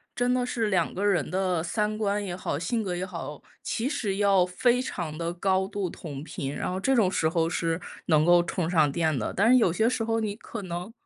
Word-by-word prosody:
真 245 Hz, +1 st, +1 dB
的 250 Hz, -1 st, +1 dB
是 230 Hz, -3 st, -1 dB
2 185 Hz, -5 st, +1 dB
个 200 Hz, +2 st, -2 dB
人 180 Hz, -7 st, +2 dB
的 185 Hz, -3 st, 0 dB
三 210 Hz, +4 st, -1 dB
观 205 Hz, -1 st, 0 dB
也 180 Hz, -3 st, -4 dB
好、 160 Hz, -5 st, -3 dB
性 220 Hz, +7 st, -1 dB
格 180 Hz, -3 st, -2 dB
也 180 Hz, +1 st, -2 dB
好， 165 Hz, -5 st, -7 dB, 0.2 s
其 230 Hz, -, -1 dB
实 220 Hz, -9 st, -2 dB
要 200 Hz, -3 st, +4 dB
非 240 Hz, +7 st, +2 dB
常 170 Hz, -11 st, -4 dB
地 170 Hz, +1 st, -2 dB
高 190 Hz, +1 st, +1 dB
度 200 Hz, -3 st, -3 dB
同 145 Hz, -5 st, -7 dB
频， 140 Hz, -3 st, -5 dB
然 -, -, -3 dB
后 185 Hz, -, -2 dB
这 265 Hz, +7 st, +2 dB
种 215 Hz, -6 st, +4 dB
时 160 Hz, -4 st, +1 dB
候 165 Hz, -1 st, +1 dB
是 165 Hz, -1 st, -1 dB, 0.3 s
能 155 Hz, -2 st, +4 dB
够 175 Hz, 0 st, +6 dB
充 175 Hz, -1 st, -2 dB
上 155 Hz, -5 st, +3 dB
电 160 Hz, -2 st, 0 dB
的， 105 Hz, -, -2 dB
但 205 Hz, +4 st, +3 dB
是 255 Hz, -, +7 dB
有 220 Hz, -8 st, +4 dB
些 220 Hz, +6 st, +2 dB
时 240 Hz, -2 st, 0 dB
候 225 Hz, 0 st, 0 dB
你 210 Hz, -2 st, -2 dB
可 225 Hz, 0 st, -8 dB
能 180 Hz, +3 st, -5 dB
185 Hz, 250 characters per minute, -27 LUFS, 170-215 Hz, 0.3 s, 是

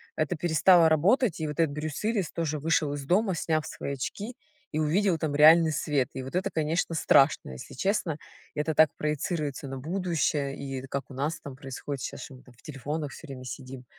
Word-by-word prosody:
это 155 Hz, +2 st, -1 dB
перестало 170 Hz, +1 st, +5 dB
работать, 180 Hz, -, +3 dB
и 155 Hz, -, -1 dB
вот 150 Hz, +3 st, -6 dB
этот 160 Hz, -3 st, +3 dB
Брюс 150 Hz, 0 st, -4 dB
Уиллис 215 Hz, -6 st, 0 dB
тоже 155 Hz, -3 st, -2 dB
вышел 155 Hz, -1 st, +1 dB
из 145 Hz, -, -5 dB
дома, 190 Hz, +3 st, +2 dB
сняв 155 Hz, -2 st, 0 dB
свои 140 Hz, -, -5 dB
очки 205 Hz, -, -5 dB, 0.4 s
и -, -, -3 dB
увидел 170 Hz, +4 st, +2 dB
там 155 Hz, -2 st, -2 dB
реальный 160 Hz, +2 st, +7 dB
свет. 145 Hz, -4 st, 0 dB
И 130 Hz, -, -5 dB
вот 135 Hz, +6 st, -7 dB
это, 185 Hz, -, 0 dB
конечно, 160 Hz, +2 st, 0 dB
страшно, 140 Hz, -, +4 dB
если 65 Hz, -, -9 dB
честно. 180 Hz, -, 0 dB, 0.4 s
Это 150 Hz, +1 st, -1 dB
так 155 Hz, 0 st, +6 dB
проецируется 150 Hz, -2 st, -2 dB
на 135 Hz, 0 st, -5 dB
будущее 155 Hz, -3 st, -1 dB
и 135 Hz, -1 st, -5 dB
как 140 Hz, +1 st, -4 dB
у -, -, -10 dB
нас 145 Hz, +5 st, -2 dB
там 140 Hz, -2 st, -8 dB
происходит 135 Hz, 0 st, -6 dB
щас, -, -, -5 dB
что 135 Hz, -, -9 dB
мы, 130 Hz, -, -16 dB
там, 125 Hz, -, -18 dB
в -, -, -23 dB
телефонах 145 Hz, +1 st, -4 dB
всё -, -, -11 dB
время 130 Hz, -3 st, -9 dB
сидим. 130 Hz, -1 st, -8 dB
150 Hz, 200 wpm, -28 LUFS, 140-165 Hz, 0.4 s, реальный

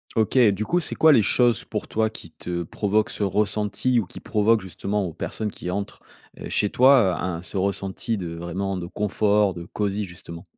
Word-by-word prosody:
OK. 110 Hz, +3 st, +2 dB
Du 110 Hz, +3 st, -3 dB
coup 175 Hz, -, +1 dB
c'est 175 Hz, -, -2 dB
quoi 160 Hz, -, +6 dB
les 115 Hz, -, +5 dB
choses 120 Hz, +1 st, +3 dB
pour -, -, -4 dB
toi 110 Hz, 0 st, 0 dB
qui 95 Hz, -6 st, -9 dB
te 85 Hz, +1 st, -4 dB
provoquent 105 Hz, +5 st, 0 dB
ce -, -, -4 dB
ressenti 105 Hz, +5 st, +1 dB
ou 110 Hz, -, -2 dB
qui -, -, -11 dB
provoquent, 110 Hz, +1 st, +2 dB
justement, 95 Hz, +3 st, -3 dB
aux 85 Hz, -, -5 dB
personnes 105 Hz, +6 st, -4 dB
qui 90 Hz, -, -7 dB
entrent, 100 Hz, +2 st, -4 dB, 0.4 s
heu, -, -, -6 dB
chez 105 Hz, -, +1 dB
toi, 125 Hz, -8 st, +5 dB
un 90 Hz, -2 st, -3 dB
ce 90 Hz, -, -7 dB
ressenti 100 Hz, +3 st, -2 dB
de, 85 Hz, -3 st, -5 dB
vraiment, 95 Hz, +4 st, -3 dB
de 85 Hz, -1 st, -5 dB
confort, 105 Hz, 0 st, +1 dB
de 85 Hz, -1 st, -8 dB
cosy 105 Hz, +2 st, -2 dB
justement? 85 Hz, -2 st, -10 dB
100 Hz, 200 wpm, -24 LUFS, 90-110 Hz, 0.4 s, quoi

